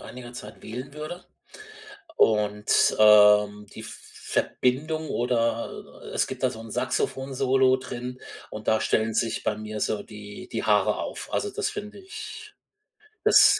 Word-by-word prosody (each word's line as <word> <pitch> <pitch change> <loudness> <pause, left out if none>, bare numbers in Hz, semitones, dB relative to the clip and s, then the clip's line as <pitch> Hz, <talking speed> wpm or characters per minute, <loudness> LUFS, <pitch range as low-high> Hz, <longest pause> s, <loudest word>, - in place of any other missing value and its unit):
einiger 125 -1 -10
Zeit 105 -3 -10
wählen 125 +5 -7
würde. 155 +4 -7 0.9
Und, 105 -1 +3
ähm, 105 -1 +6
die - - -8
Verbindung 155 +5 -2
oder 115 -1 -2
es - - +1
gibt - - -7
da - - +4
so 110 - -9
'n 115 0 -9
Saxophon-Solo 130 +1 +1
drin 125 0 -6 0.3
und 105 0 -8
da 110 0 +3
stellen 110 0 +1
sich 115 0 0
bei - - 0
mir 110 0 -6
so 105 0 0
die 105 -1 -10
die - - -2
Haare - - +3
auf. - - -5
Also, 415 - 0
das 425 +1 -1
finde 210 - -7
ich 415 +2 -9 0.7
das 435 - +7
120 Hz, 140 wpm, -26 LUFS, 105-135 Hz, 0.9 s, das